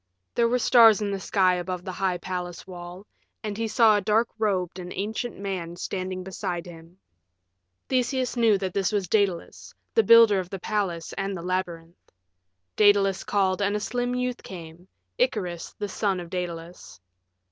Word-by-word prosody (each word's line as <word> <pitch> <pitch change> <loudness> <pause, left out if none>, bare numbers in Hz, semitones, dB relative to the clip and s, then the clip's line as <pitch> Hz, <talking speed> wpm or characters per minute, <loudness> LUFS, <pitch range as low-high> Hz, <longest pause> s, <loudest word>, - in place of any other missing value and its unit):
There 235 -1 +3
were 250 - +2
stars 230 -4 +6
in 205 -1 -2
the 195 - -2
sky 190 -1 +2
above 180 0 -4
the 185 - -4
high 185 -1 -1
palace 180 -1 -5
wall, 180 +1 -9 0.4
and 210 -2 -3
he 225 +1 -2
saw 220 -1 +5
a 205 - +1
dark 220 +3 +2
robed 190 -4 -1
and 180 0 -7
ancient 220 +4 -4
man 185 -4 -4
standing 185 +1 -4
beside 180 -2 -4
him. 165 0 -13 0.9
Theseus 255 0 0
knew 225 -4 +4
that 190 -2 -4
this 195 0 0
was 200 -3 -1
Daedalus, 195 -3 -1 0.2
the 455 - +5
builder 230 - +7
of 180 -1 -5
the 195 - -5
palace 185 -4 -2
and 195 -1 -2
the 170 - -7
labyrinth. 175 -2 -4 0.6
Daedalus 200 -2 +4
called 195 -1 +1
and 200 +1 +1
a - - 0
slim 245 +3 -2
youth 250 -1 -2
came 170 -1 -10 0.3
Icarus, 180 - -1
the 205 - -3
son 195 -2 -1
of 175 -1 -9
Daedalus. 175 - -6
190 Hz, 170 wpm, -26 LUFS, 180-215 Hz, 0.9 s, builder